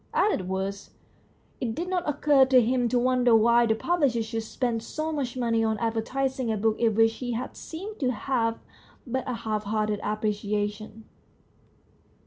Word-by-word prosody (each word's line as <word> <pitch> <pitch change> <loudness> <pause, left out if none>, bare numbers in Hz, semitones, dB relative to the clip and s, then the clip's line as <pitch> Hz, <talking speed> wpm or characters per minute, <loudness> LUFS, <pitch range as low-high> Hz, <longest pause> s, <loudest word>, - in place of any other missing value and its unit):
As 420 - +3
it 185 - -6
was, 190 +1 -3 0.7
it 230 -3 -2
did 345 - -3
not 360 -4 -1
occur 290 -1 +4
to 260 -1 +5
him 245 +1 +1
to 250 - +1
wonder 250 -1 +3
why 235 +2 +5
the 220 - +2
publisher 275 -5 +1
should 225 +1 -3
spend 230 +1 -2
so 310 +7 -4
much 265 -5 -3
money 230 -2 +1
on 220 -1 0
advertising 235 +3 -1
a 215 - -1
book 220 +2 0
of 225 -3 +3
which 225 0 +4
he 245 -2 -3
had 245 +3 -4
seemed 395 +7 -8
to 260 - +1
have 230 -1 -1 0.5
but 260 0 -3
a - - -1
half 215 -2 -3
hearted 210 0 -1
appreciation. 210 +1 -3
230 Hz, 170 wpm, -26 LUFS, 220-260 Hz, 0.7 s, to